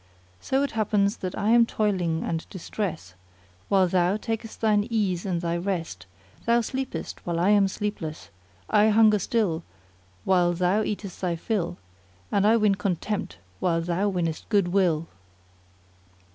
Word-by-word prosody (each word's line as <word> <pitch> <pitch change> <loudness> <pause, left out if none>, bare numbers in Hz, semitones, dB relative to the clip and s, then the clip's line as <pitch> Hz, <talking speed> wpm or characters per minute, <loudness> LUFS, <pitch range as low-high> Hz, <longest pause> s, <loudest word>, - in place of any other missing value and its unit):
So 265 - 0
it 280 - -2
happens 210 -2 +1
that 185 -1 -5
I 210 +2 +1
am 235 0 +6
toiling 185 -8 0
and 165 -1 -3
distrest 175 - -5 0.6
while 190 -2 +4
thou 180 +2 +2
takest 225 0 -5
thine 210 -1 +2
ease 200 -5 0
and 175 -3 -1
thy 170 -1 -1
rest; 170 - -4 0.4
thou 235 +1 +4
sleepest 260 +3 -5
while 170 -1 -2
I 180 +3 +3
am 205 -2 +5
sleepless; 190 -6 -5 0.4
I 210 +1 +4
hunger 215 -1 +5
still 190 -5 0 0.6
while 175 - +3
thou 180 +4 +1
eatest 205 -3 -4
thy 180 -2 0
fill, 175 -1 -2 0.5
and 200 +1 +3
I 225 +2 +5
win 210 -2 +3
contempt 195 +1 -2 0.2
while 170 -2 +1
thou 175 +4 0
winnest 170 -4 -3
good 200 -5 +2
will." 175 -4 +2
195 Hz, 145 wpm, -26 LUFS, 175-215 Hz, 0.6 s, am